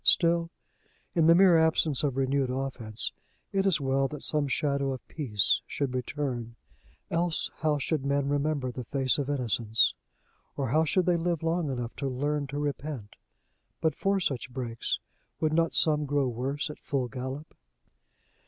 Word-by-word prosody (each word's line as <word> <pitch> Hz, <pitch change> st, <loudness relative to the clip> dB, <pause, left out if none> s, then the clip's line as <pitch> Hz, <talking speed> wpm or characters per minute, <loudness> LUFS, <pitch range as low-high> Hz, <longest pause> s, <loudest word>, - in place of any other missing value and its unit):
Still, 170 Hz, -1 st, +4 dB, 0.6 s
in 165 Hz, -2 st, +4 dB
the 165 Hz, -, +8 dB
mere 180 Hz, -2 st, +7 dB
absence 160 Hz, -3 st, +2 dB
of 140 Hz, -3 st, -1 dB
renewed 135 Hz, 0 st, +1 dB
offense, 125 Hz, -5 st, -3 dB, 0.4 s
it 195 Hz, 0 st, +2 dB
is 180 Hz, -5 st, +3 dB
well 135 Hz, 0 st, +1 dB
that 150 Hz, 0 st, -7 dB
some 150 Hz, -2 st, +1 dB
shadow 140 Hz, 0 st, 0 dB
of 130 Hz, -, -9 dB
peace 110 Hz, -, +1 dB
should 140 Hz, -3 st, -2 dB
return; 125 Hz, -2 st, -3 dB, 0.6 s
else 170 Hz, 0 st, +1 dB
how 155 Hz, -2 st, +2 dB
should 145 Hz, 0 st, -1 dB
men 140 Hz, 0 st, +1 dB
remember 145 Hz, -2 st, 0 dB
the 125 Hz, 0 st, -6 dB
face 135 Hz, 0 st, +2 dB
of 140 Hz, -1 st, -2 dB
innocence? 115 Hz, -5 st, +2 dB, 0.6 s
or 135 Hz, -3 st, -1 dB
how 155 Hz, +5 st, +3 dB
should 180 Hz, +3 st, +2 dB
they 175 Hz, -1 st, +3 dB
live 170 Hz, -1 st, -1 dB
long 165 Hz, -1 st, 0 dB
enough 120 Hz, -3 st, -4 dB
to 140 Hz, -, -2 dB
learn 145 Hz, +2 st, -1 dB
to 140 Hz, +1 st, -5 dB
repent? 145 Hz, -6 st, -4 dB, 0.6 s
But 160 Hz, -, +1 dB
for 195 Hz, 0 st, +1 dB
such 135 Hz, -8 st, -2 dB
breaks, 120 Hz, -2 st, -2 dB, 0.4 s
would 155 Hz, -1 st, +1 dB
not 165 Hz, +1 st, +2 dB
some 150 Hz, -2 st, +3 dB
grow 140 Hz, -1 st, +1 dB
worse 135 Hz, +5 st, -2 dB
at -, -, -12 dB
full 135 Hz, -3 st, -1 dB
gallop? 130 Hz, +4 st, -6 dB
140 Hz, 160 wpm, -28 LUFS, 130-155 Hz, 0.6 s, the